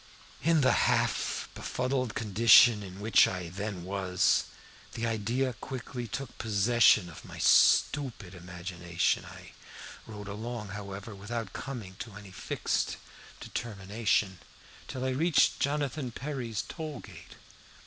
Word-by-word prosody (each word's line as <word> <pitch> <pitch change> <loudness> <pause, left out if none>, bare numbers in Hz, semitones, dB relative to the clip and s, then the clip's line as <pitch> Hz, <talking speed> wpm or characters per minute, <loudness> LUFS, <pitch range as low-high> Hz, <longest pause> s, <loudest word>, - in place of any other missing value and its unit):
"In 160 +1 +3
the 130 - +4 0.2
half - - 0
befuddled 125 -2 -2
condition 110 +1 +6
in 95 0 -9
which 110 +2 +5
I 90 -2 -4
then 95 0 -5
was, 95 -1 +1 0.5
the 115 - -3
idea 115 +4 -1
quickly 120 +1 -6
took 130 +3 -6
possession 110 -2 +4
of 85 - -11
my - - -10
stupid 120 -10 +3
imagination. 85 -1 -2
I - - -12 0.6
rode 105 -2 -8
along, 110 +1 -5
however, 100 +1 -7
without 105 +1 -5
coming 115 -9 -7
to 115 - -7
any 100 -2 -11
fixed - - -2 0.4
determination, 105 -3 -1 0.5
till 130 0 -4
I 130 - 0
reached 155 +5 +3
Jonathan 145 -1 -1
Perry's 120 -4 -4
toll 155 -4 -6
gate. - - -13
110 Hz, 120 wpm, -29 LUFS, 95-125 Hz, 0.6 s, condition